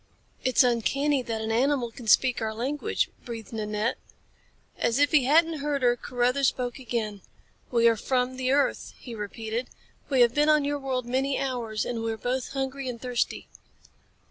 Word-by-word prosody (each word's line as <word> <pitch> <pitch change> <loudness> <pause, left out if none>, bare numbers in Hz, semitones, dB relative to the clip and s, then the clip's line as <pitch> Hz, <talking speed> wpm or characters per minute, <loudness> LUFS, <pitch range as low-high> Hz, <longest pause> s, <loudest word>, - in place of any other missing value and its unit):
"It's 255 +1 +4
uncanny 270 +4 +1
that 225 -2 -4
an 220 - -2
animal 250 0 +1
can 230 0 -11
speak 250 +2 +4
our 220 -1 -2
language," 290 - -1
breathed 230 -2 -8
Nanette. 215 +1 -2 0.8
As 235 +1 +1
if 290 0 +3
he 295 -5 +4
hadn't 320 +3 +4
heard 285 -1 -1
her, 240 0 +4
Carruthers 250 +3 +1
spoke 245 0 -2
again. 220 -5 -3 0.5
"We 235 -1 +4
are 230 - +5
from 250 +3 0
the 255 0 -1
earth," 280 +1 +1
he 240 - -9
repeated. 225 +3 -4 0.4
"We 265 -3 +3
have 240 -1 +5
been 295 +2 +3
on 305 -2 +4
your 290 0 -1
world 260 -3 -2
many 265 +3 0
hours, 240 -5 -2
and 235 -2 -3
we 225 0 -1
are 220 - -4
both 250 +3 -2
hungry 270 -1 -3
and 235 -2 -6
thirsty." 245 -1 -2
250 Hz, 175 wpm, -27 LUFS, 230-275 Hz, 0.8 s, are